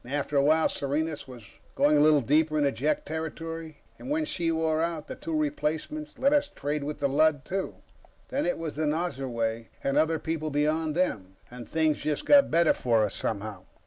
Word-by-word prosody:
After 145 +3 -3
a 140 - +5
while, 155 +3 +4
Serenus 145 +2 -2
was 125 -3 -11 0.3
going 150 +1 +4
a - - +5
little 150 -1 +5
deeper 155 +4 +2
into 145 -2 +2
Jek 145 +6 -1
territory, 160 0 -6 0.2
and 260 - -8
when 310 +1 0
she 170 - -1
wore 160 -1 +1
out, 165 -2 -2
the - - -5
two 315 +4 -3
replacements 300 - -3
let 275 +2 +3
us 290 -1 +2
trade 145 - -3
with 150 +1 -4
the 140 - +1
Lud, 145 +1 +2
too. 190 +1 -3 0.5
Then 280 +3 -1
it 265 - 0
was 165 -2 -5
the 155 -1 0
Nosurwey, 130 -8 -2 0.2
and 140 +1 0
other 160 +1 +2
people 160 -1 -3
beyond 155 +2 0
them, 100 - -1 0.2
and 125 -1 -10
things 160 -2 +1
just 150 -1 -2
got 285 -1 +6
better 170 0 +4
for 115 -3 +2
us, 105 - -4
somehow. 100 -3 -4
155 Hz, 195 wpm, -27 LUFS, 140-165 Hz, 0.5 s, got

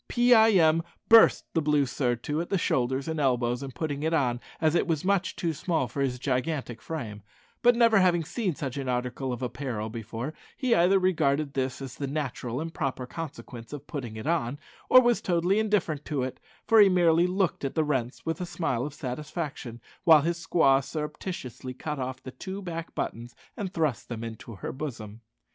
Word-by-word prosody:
Pee 245 0 +4
eye 220 -1 +6
em 165 -3 +5 0.3
burst 225 -1 +7
the 165 - +2
blue 150 -2 +2
surtout 125 +3 -1
at 175 - -6
the 195 - +1
shoulders 130 -3 0
and 160 -1 -2
elbows 125 -3 +1
in 135 -1 -6
putting 145 +2 -3
it 160 +2 +1
on, 125 -5 +1 0.2
as 155 -2 +2
it 175 - +2
was 165 -1 -1
much 195 -1 +1
too 170 -4 -1
small 155 -3 -1
for 140 +5 -4
his 130 -2 0
gigantic 130 -2 -2
frame; 115 -10 -6 0.4
but 245 0 +5
never 230 -3 +5
having 175 -3 +3
seen 185 0 -2
such 135 -2 -4
an 135 -2 -3
article 125 +1 -2
of 125 +1 -4
apparel 120 -4 -4
before, 115 +5 -5 0.2
he 255 -3 +2
either 185 0 +5
regarded 155 -6 +1
this 130 0 -2
as 130 -2 -7
the 140 - -3
natural 135 -4 -3
and 165 +1 -5
proper 135 -5 -2
consequence 125 -5 -8
of 145 -1 -7
putting 125 -9 -6
it 110 - -7
on, 150 -5 0 0.3
or 255 - +9
was 240 -2 +3
totally 180 +3 +2
indifferent 195 -9 0
to 145 -4 -2
it, 130 - -5 0.3
for 225 0 +5
he 205 -2 +8
merely 175 -1 +4
looked 185 -3 0
at 135 - -3
the 160 - +3
rents 130 -4 -2
with 165 +2 -2
a - - -1
smile 135 -9 -1
of 145 0 -5
satisfaction, 140 -2 -5 0.2
while 160 -5 +7
his 170 +2 -2
squaw 135 -6 +4
surreptitiously 150 -4 -6
cut 150 +2 -4
off 130 0 -4
the 130 - -7
two 190 +9 -6
back 170 -4 -6
buttons 120 +1 -4 0.2
and 195 -3 -4
thrust 155 -8 -1
them 115 -1 -5
into 115 0 -8
her - - -5
bosom. 115 -6 -7
145 Hz, 195 wpm, -27 LUFS, 125-170 Hz, 0.4 s, or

